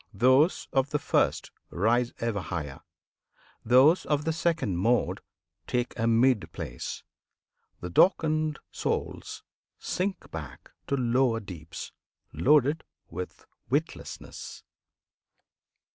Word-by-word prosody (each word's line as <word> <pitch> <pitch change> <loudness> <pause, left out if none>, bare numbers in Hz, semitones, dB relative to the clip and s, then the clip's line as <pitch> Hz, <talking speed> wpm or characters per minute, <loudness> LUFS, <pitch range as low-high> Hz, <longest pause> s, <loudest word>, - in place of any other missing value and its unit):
Those 130 - +4
of 135 +1 +2
the 150 - +1
first - - 0 0.2
Rise 120 +6 +1
ever 115 -4 -1
higher; 75 -7 -5 0.8
those 130 +9 +5
of 150 0 0
the 160 - +1
second 165 - 0
mode 115 +7 +1 0.5
Take 125 0 -1
a 115 -1 0
mid 115 0 +3
place; - - -6 0.8
the 90 - -4
darkened 155 - +3
souls - - -3 0.3
sink 190 +1 -3
back - - -8 0.2
To 140 - +1
lower 120 -1 +2
deeps, 85 -6 -8 0.4
loaded 150 +2 +3 0.3
with 90 +2 -7 0.2
witlessness! - - -4
125 Hz, 100 wpm, -28 LUFS, 110-150 Hz, 0.8 s, those